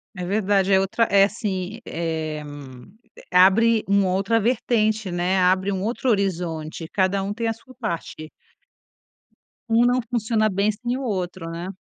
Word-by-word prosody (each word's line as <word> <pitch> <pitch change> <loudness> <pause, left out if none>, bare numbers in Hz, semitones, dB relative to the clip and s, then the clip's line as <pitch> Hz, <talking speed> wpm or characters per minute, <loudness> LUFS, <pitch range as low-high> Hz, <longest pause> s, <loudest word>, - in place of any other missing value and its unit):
É 180 - -5
verdade, 195 0 +1
é 190 - +6
outra 220 +4 +1
é 195 0 +6
assim, 200 0 -4
eh, 160 -2 -3 0.9
abre 210 +5 +5
uma 200 -1 +2
outra 195 +5 +1
vertente, 220 -3 0
né, 175 +2 0
abre 185 +2 +2
um 190 -1 -2
outro 240 +4 -1
horizonte, 170 -6 -2
cada 195 0 +1
um 200 - -3
tem 230 +1 -3
a 225 - 0
sua 255 +3 -18
parte. 170 -8 -5 1.4
Um 230 +1 +4
não 250 +1 +3
funciona 220 -2 +1
bem 200 +2 +1
sem 240 +4 -3
o 275 - -5
outro, 185 -6 -3
né. 170 +2 -6
200 Hz, 155 wpm, -23 LUFS, 180-225 Hz, 1.4 s, é